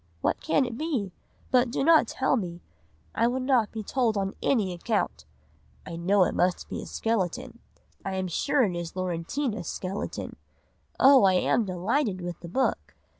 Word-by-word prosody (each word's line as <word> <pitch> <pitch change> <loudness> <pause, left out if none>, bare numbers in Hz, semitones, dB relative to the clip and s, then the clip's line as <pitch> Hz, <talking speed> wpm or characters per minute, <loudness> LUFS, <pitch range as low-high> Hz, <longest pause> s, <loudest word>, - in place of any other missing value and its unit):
what - - 0
can 280 -4 +2
it 240 -1 -6
be? 275 - -2 0.4
But 250 -1 +4
do 250 - -1
not 320 -5 +6
tell 265 +3 +1
me, 175 -7 -4 0.5
I 230 - +2
would 255 +2 -1
not 255 -5 +2
be 220 -1 -5
told 230 -1 0
on 195 0 -1
any 210 -9 +1
account. 175 - -2 0.6
I 170 - -6
know 185 +3 +3
it - - 0
must 180 0 0
be - - -4
a - - -9
skeleton, 225 +2 -2 0.4
I 195 -1 -3
am 190 0 -1
sure 260 - +1
it 190 -6 0
is 170 -1 -5
Laurentina's 185 - -2
skeleton! 190 +2 -5 0.6
Oh! 270 -2 +7
I 190 - +5
am 210 +5 +2
delighted 195 +3 -1
with 175 -1 -6
the 170 - -9
book! 260 +9 -1
205 Hz, 175 wpm, -27 LUFS, 185-255 Hz, 0.6 s, Oh